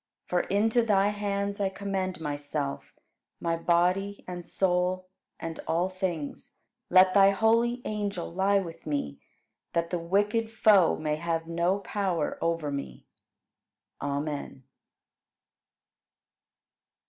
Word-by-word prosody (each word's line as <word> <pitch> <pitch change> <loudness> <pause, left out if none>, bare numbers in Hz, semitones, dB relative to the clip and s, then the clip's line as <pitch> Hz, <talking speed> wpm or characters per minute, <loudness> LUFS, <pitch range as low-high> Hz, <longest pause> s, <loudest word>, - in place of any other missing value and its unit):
For 180 - +1
into 220 +6 +2
Thy 205 -3 +3
hands 200 -1 -2
I 195 - +2
commend 190 -2 -3
myself, 145 -2 -4 0.4
my 165 -1 0
body 180 +4 +1
and 180 -1 -6
soul, 185 +1 0 0.3
and 165 0 -5
all 175 +3 +1
things. 185 -6 -4 0.3
Let 185 +1 +6
Thy 195 -1 +7
holy 230 +4 +2
angel 205 -5 -3
lie 195 +2 +3
with 170 -5 -5
me, 75 - -2 0.5
that 170 0 0
the 175 - 0
wicked 205 +6 +1
Foe 210 -5 +5
may 150 -1 -1
have 165 0 -2
no 170 +3 +1
power 190 -7 -2
over 165 -3 0
me. 140 - -6 1.0
Amen. 145 -1 -3
185 Hz, 110 wpm, -28 LUFS, 165-200 Hz, 1.0 s, Thy